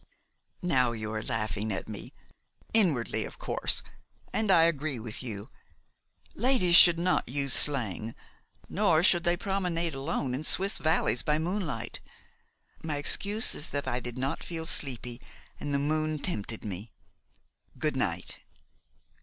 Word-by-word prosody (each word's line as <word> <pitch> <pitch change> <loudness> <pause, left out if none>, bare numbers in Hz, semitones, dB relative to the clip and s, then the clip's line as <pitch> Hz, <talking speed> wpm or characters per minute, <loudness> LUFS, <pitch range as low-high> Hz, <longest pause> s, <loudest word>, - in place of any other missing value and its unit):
"Now 130 -8 +2
you 110 -1 -5
are 110 - -2
laughing 110 -1 -2
at 95 - -3
me, 110 -2 -8 0.6
inwardly 170 - +2
of - - -8
course, - - +1 0.5
and 220 -2 0
I 170 -4 +6
agree 155 -4 0
with 110 -1 -6
you. 105 -5 -7 0.8
Ladies 230 -8 +3
should 170 0 +9
not 175 -6 +1
use 140 0 0
slang, 115 -6 +2 0.5
nor 175 -5 +2
should 175 -2 +4
they 175 0 +2
promenade 180 -4 -1
alone 135 -1 -2
in 135 +4 -3
Swiss 195 +6 +1
valleys 155 -8 +2
by 150 0 +1
moonlight. 160 - -3 0.8
My 155 -2 -2
excuse 205 +9 0
is 150 - +2
that 145 -2 -3
I 125 -1 0
did 120 0 -7
not 135 +2 -2
feel 165 -2 -5
sleepy, 125 -5 0 0.4
and 145 - -4
the 140 - +2
moon 155 +2 0
tempted 115 - -2
me. 100 +2 -6 0.9
Good - - -1
night." - - -2
145 Hz, 140 wpm, -29 LUFS, 120-170 Hz, 0.9 s, should